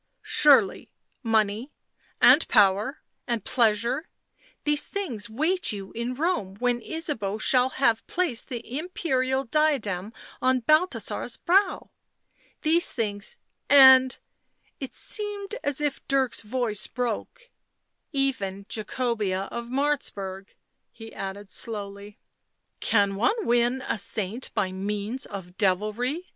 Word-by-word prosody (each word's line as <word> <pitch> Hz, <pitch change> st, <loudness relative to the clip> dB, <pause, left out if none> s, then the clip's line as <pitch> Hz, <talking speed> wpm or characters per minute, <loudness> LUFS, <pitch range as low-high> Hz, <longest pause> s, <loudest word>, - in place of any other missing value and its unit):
Surely -, -, +4 dB, 0.2 s
— -, -, -47 dB, 0.2 s
money 215 Hz, +6 st, -1 dB, 0.2 s
— -, -, -37 dB
and -, -, +6 dB
power 205 Hz, +7 st, +3 dB, 0.2 s
and 235 Hz, -2 st, -2 dB
pleasure 235 Hz, +6 st, +1 dB, 0.3 s
— -, -, -33 dB
these 295 Hz, 0 st, +1 dB
things 245 Hz, -, -3 dB
wait 315 Hz, +11 st, 0 dB
you 195 Hz, -2 st, -6 dB
in 235 Hz, +2 st, -4 dB
Rome 260 Hz, -, -1 dB
when 245 Hz, +2 st, 0 dB
Ysabeau 230 Hz, -9 st, -2 dB
shall 250 Hz, +3 st, +3 dB
have 230 Hz, -4 st, +2 dB
placed 345 Hz, -10 st, -1 dB
the 245 Hz, +2 st, -5 dB
imperial 265 Hz, -6 st, -1 dB
diadem 230 Hz, -9 st, 0 dB, 0.3 s
on 255 Hz, 0 st, +2 dB
Balthasar's 310 Hz, +9 st, +1 dB
brow. 375 Hz, +2 st, +1 dB, 0.7 s
These 335 Hz, +2 st, +3 dB
things 210 Hz, -, -3 dB, 0.2 s
— -, -, -49 dB
and 265 Hz, -2 st, +8 dB, 0.2 s
" -, -, -49 dB
— -, -, -40 dB
it 260 Hz, -2 st, -6 dB
seemed 415 Hz, -1 st, -4 dB
as 285 Hz, -1 st, 0 dB
if 295 Hz, -2 st, -1 dB
Dirk's 270 Hz, -2 st, +2 dB
voice 220 Hz, -2 st, -1 dB
broke 250 Hz, -, -4 dB, 0.3 s
— -, -, -52 dB
u 280 Hz, -, -2 dB
even 200 Hz, -8 st, -2 dB
Jacobea 215 Hz, -4 st, -2 dB
of 235 Hz, 0 st, -5 dB
Martzburg," 235 Hz, -8 st, -2 dB, 0.4 s
he 225 Hz, -1 st, -12 dB
added 195 Hz, +1 st, -7 dB
slowly. 205 Hz, -1 st, -4 dB, 0.3 s
" -, -, -52 dB
Can 200 Hz, -3 st, +3 dB
one 410 Hz, -, +1 dB
win 240 Hz, +2 st, +2 dB
a 225 Hz, -, -1 dB
saint 210 Hz, +4 st, -2 dB
by 185 Hz, -2 st, 0 dB
means 205 Hz, +6 st, -3 dB
of 185 Hz, -3 st, -9 dB
devilry 215 Hz, -, 0 dB
240 Hz, 130 wpm, -26 LUFS, 205-285 Hz, 0.7 s, and